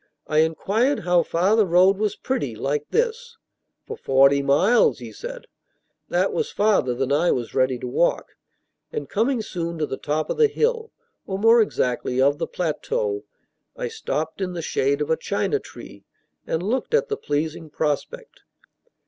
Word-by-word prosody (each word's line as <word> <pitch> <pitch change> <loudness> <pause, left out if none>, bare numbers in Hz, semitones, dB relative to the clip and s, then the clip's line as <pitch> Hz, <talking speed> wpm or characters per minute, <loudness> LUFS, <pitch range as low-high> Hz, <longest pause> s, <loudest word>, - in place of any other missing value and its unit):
I 155 - +1
inquired 200 - +1
how 175 -1 +3
far 185 +7 +1
the 220 - +5
road 185 +3 +4
was 210 -1 0
pretty, 240 - -3
like 140 +6 -2
this. 470 0 -1 0.5
"For 450 - -6
forty 135 - +4
miles," 150 +13 +3
he - - -9
said. - - -8 0.6
That - - +1
was 465 -1 -1
farther 200 - +2
than 135 +2 -2
I 150 +5 +3
was 120 -2 -1
ready 130 -1 +1
to 125 - -6
walk, 150 +7 0 0.6
and 450 - -4
coming 230 +2 0
soon 170 -4 -4
to 155 - 0
the 135 - -5
top 150 +1 -2
of - - -3
the 455 -1 +5
hill, 460 +1 -1 0.4
or, 190 - -2
more 225 +3 +5
exactly, 125 - -1
of 140 +3 +3
the - - -2
plateau, 415 - -2 0.5
I - - -4
stopped 160 - -4
in 180 -1 -2
the 170 -2 -5
shade 140 -1 0
of 150 - -1
a - - +4
china 310 - -1
tree, - - -13 0.4
and 160 +2 -1
looked 255 - 0
at 485 +2 +2
the 430 - 0
pleasing 155 - -3
prospect. 160 - -3
180 Hz, 170 wpm, -23 LUFS, -, 0.6 s, the